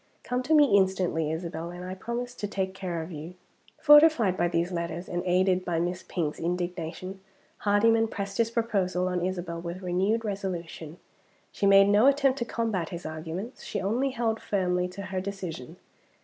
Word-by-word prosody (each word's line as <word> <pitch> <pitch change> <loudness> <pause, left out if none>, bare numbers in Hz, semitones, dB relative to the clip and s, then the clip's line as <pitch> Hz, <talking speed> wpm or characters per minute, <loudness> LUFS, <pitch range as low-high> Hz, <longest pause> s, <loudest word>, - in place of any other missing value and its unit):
Come 250 0 -1
to 315 +5 +2
me 290 -8 +6
instantly, 185 -5 +1
Isabel, 165 0 -4
and 175 +1 -8
I 185 - -5
promise 235 +5 -4
to 205 - -4
take 190 -2 -2
care 180 -4 -4
of 165 - -9
you." 160 +3 -8 0.4
Fortified 295 - +6
by 175 -1 +1
these 170 +1 0
letters, 170 0 -4
and 175 - -2
aided 185 +1 +2
by 170 -2 -1
Miss 175 +2 -2
Pink's 160 -6 -3
indignation, 175 +1 -4 0.4
Hardyman 225 +2 +3
pressed 200 -2 -5
his 230 -1 +3
proposal 195 -6 0
on 180 -1 -1
Isabel 175 -2 -3
with 175 +2 -6
renewed 195 +6 0
resolution. 175 -5 -5 0.5
She 200 - 0
made 195 0 +7
no 205 +5 +5
attempt 275 -1 +3
to 235 - -1
combat 220 -8 -2
his 170 -1 -7
arguments 160 +9 -6
she - - -3
only 235 +8 0
held 230 -3 -1
firmly 180 -2 0
to 180 +2 -8
her 185 0 -3
decision. 185 -9 -6
185 Hz, 175 wpm, -27 LUFS, 175-215 Hz, 0.5 s, made